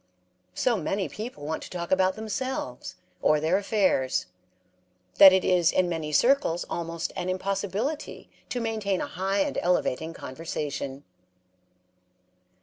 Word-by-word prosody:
So 245 -3 +2
many 195 +2 -1
people 215 - -7
want 160 +1 -3
to - - -9
talk 170 -1 -5
about 190 0 +3
themselves, 220 - -4 0.3
or 155 - +4
their 165 +5 +2
affairs, 185 - +1 0.9
that 190 - +11
it 190 0 +2
is 175 -2 +4
in 185 - +2
many 160 -3 -3
circles 235 - +3
almost 170 0 -3
an 180 - -3
impossibility 200 - -3 0.2
to 250 - -2
maintain 215 -5 -1
a - - -1
high 195 +3 -1
and - - -1
elevating 165 -2 0
conversation. 140 -1 -5
185 Hz, 130 wpm, -27 LUFS, 160-205 Hz, 0.9 s, that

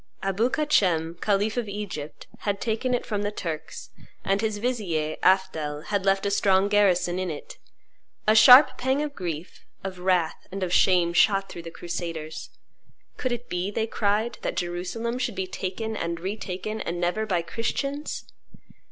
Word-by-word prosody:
Abou 195 +5 +1
Kacem, 180 - +2
khalif 210 +2 +1
of 235 -4 -1
Egypt, 195 -8 -6
had 200 -1 -2
taken 245 +3 0
it 245 - -3
from 205 -2 -2
the 205 - 0
Turks; 165 -7 -6 0.3
and 195 +1 +1
his 220 -2 -1
vizier, 195 -10 -1
Afdhel, 160 -6 +1
had 200 -2 0
left 195 0 +2
a 200 - +1
strong 195 0 +3
garrison 185 -3 +3
in 185 -1 -2
it. 150 -3 -8 0.7
A 215 - +6
sharp 250 +6 +8
pang 265 +3 +1
of 295 -1 -4
grief, 170 - -6 0.2
of 190 -2 -5
wrath, 180 -3 0
and 195 0 -3
of 180 -1 -2
shame 175 -3 +4
shot 195 +1 +3
through 170 - -7
the 165 - -8
crusaders. 165 -2 -5 0.7
"Could 255 - -1
it 240 0 -4
be," 180 +2 -2
they 220 +2 -1
cried, 220 +1 0
"that - - -3
Jerusalem 185 +8 -3
should 240 -4 -2
be 190 - -2
taken 195 +4 -4
and 170 -3 -3
retaken, 195 +2 -4
and 175 +1 -3
never 180 +5 0
by 175 -4 +1
Christians?" 275 - -3
195 Hz, 165 wpm, -26 LUFS, 175-220 Hz, 0.7 s, sharp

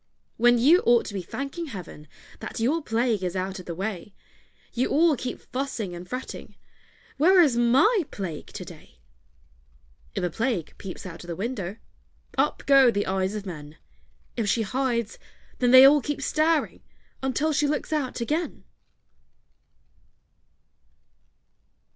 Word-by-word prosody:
When 240 +1 +5
you 300 +10 +5
ought 240 0 +4
to - - -7
be 195 - -3
thanking 275 - -5
heaven 175 - -9 0.3
That - - -6
your 280 +9 +1
Plague 225 -5 0
is 180 0 -2
out 190 +1 -3
of 180 - -11
the 170 - -4
way, 195 +1 -5 0.6
You 250 +2 0
all 320 +1 +4
keep 250 0 -5
fussing 250 -8 -4
and 175 +1 -9
fretting 255 +1 -7 0.6
"Where 365 +6 +5
is 295 -8 +5
my 270 - +4
Plague 170 -7 -6
to - - -8
day?" - - -14 1.2
If - - -2
a 175 - -1
Plague 220 - -2
peeps 195 0 -8
out 170 -1 -8
of - - -13
the 170 - -4
window, 200 -1 -4 0.6
Up - - 0
go 275 -2 +6
the 205 -3 0
eyes 190 +1 -1
of 210 -1 -5
men; 155 -4 -9 0.6
If 225 -4 -1
she 225 +2 +1
hides, 235 -1 -2 0.4
then 245 - +3
they 260 +1 +10
all 290 +1 +6
keep 290 0 -4
staring 315 +2 +1 0.4
Until 285 +4 0
she 295 0 +2
looks 300 +1 -2
out 270 -5 -2
again. 310 +8 -2
235 Hz, 150 wpm, -25 LUFS, 190-275 Hz, 1.2 s, they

